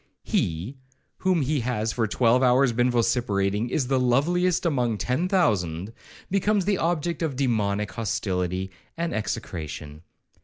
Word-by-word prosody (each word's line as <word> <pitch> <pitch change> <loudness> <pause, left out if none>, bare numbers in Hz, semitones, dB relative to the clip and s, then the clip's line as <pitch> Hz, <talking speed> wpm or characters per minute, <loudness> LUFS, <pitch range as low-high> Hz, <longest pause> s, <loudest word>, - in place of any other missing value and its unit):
'He, 90 - -1 0.4
whom 185 -5 +1
he 145 +2 0
has 115 -2 -1
for 115 -2 0
twelve 120 +3 +3
hours 130 0 +4
been 120 +2 +2
vociferating 110 -3 +1
'is 135 +1 0
the 130 +1 +1
loveliest 170 +9 +2
among 125 -8 +1
ten 130 - 0
thousand,' 100 - +1 0.4
becomes 200 0 +2
the 200 -2 +1
object 170 0 -1
of 160 -5 -1
demoniac 105 -6 0
hostility 95 -3 -2 0.3
and 170 0 -2
execration. 80 -9 -5
120 Hz, 130 wpm, -25 LUFS, 100-150 Hz, 0.4 s, hours